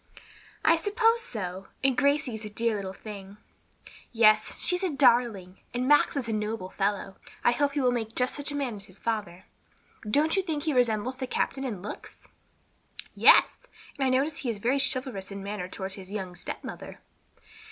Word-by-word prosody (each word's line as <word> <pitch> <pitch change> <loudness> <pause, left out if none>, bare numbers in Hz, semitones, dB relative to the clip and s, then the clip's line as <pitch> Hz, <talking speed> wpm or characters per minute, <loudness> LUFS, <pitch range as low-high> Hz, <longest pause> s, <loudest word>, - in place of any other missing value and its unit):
"I 330 +1 +6
suppose 450 +6 +2
so. 190 - -6 0.2
And 270 -1 +3
Gracie 280 0 +2
is 220 0 -6
a 210 - -6
dear 230 +1 0
little 195 -2 -4
thing." 200 0 -10 0.7
"Yes, 215 -2 +4
she's 360 +1 +1
a 375 - +2
darling. 235 - +2 0.2
And 250 +1 0
Max 295 0 +4
is 255 -4 -2
a 225 - -1
noble 210 -2 -3
fellow. 195 -1 -2 0.3
I - - +5
hope 280 +3 +1
he 290 - 0
will 250 -1 +3
make 225 -2 -3
just 250 0 +1
such 290 0 -4
a - - -4
man 260 -7 -2
as 200 - -7
his 185 -1 -14
father. 205 -5 -3 0.6
Don't 305 +8 +2
you 385 - +3
think 315 -6 -3
he 310 - 0
resembles 245 0 +1
the 260 -1 -4
captain 270 +2 -1
in 210 -9 -4
looks?" 210 - -9 0.9
"Yes, - - +6 0.4
and - - +1
I 265 - +3
notice 275 +4 +1
he 255 - -3
is 225 - -2
very 245 +7 +1
chivalrous 255 -7 0
in 200 - -7
his 195 - -7
manner 200 -3 -4
toward 190 0 -6
his 190 -1 -9
young 190 -4 -4
stepmother." 175 - -7
235 Hz, 190 wpm, -28 LUFS, 200-275 Hz, 0.9 s, I